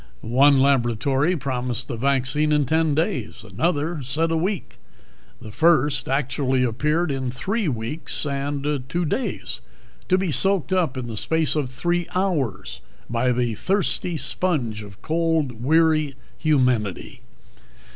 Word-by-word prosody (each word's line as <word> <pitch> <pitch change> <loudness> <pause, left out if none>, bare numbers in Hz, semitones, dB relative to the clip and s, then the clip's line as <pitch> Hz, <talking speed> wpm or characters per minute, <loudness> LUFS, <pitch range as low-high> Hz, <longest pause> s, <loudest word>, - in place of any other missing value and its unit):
One 135 +4 +4
laboratory 135 +4 +2
promised 125 -4 -3
the - - -4
vaccine 135 +4 +1
in 150 -1 +3
ten 160 +2 +1
days; 130 -9 -2
another 155 - -1
said 155 +6 +1
a - - +1
week. 185 +2 -3 0.6
The 110 - -10
first 150 -2 +3
actually 130 -1 0
appeared 150 +7 0
in 135 -2 -2
three 195 - -2
weeks 125 +5 -2
and 140 0 -2
two 175 0 -1
days, 250 - -3 0.5
to 185 - +4
be 190 -3 -1
soaked 185 +6 +1
up 165 -8 +1
in 130 - -3
the 115 -2 -6
space 160 +6 0
of 145 -4 -1
three 175 +6 -1
hours 135 - -1 0.3
by 120 +2 +1
the 120 -1 0
thirsty 180 - -1
sponge 135 -11 -1
of 100 0 -13
cold 160 -7 0
weary 155 -1 +3 0.2
humanity. 125 - 0
140 Hz, 135 wpm, -23 LUFS, 125-165 Hz, 0.6 s, One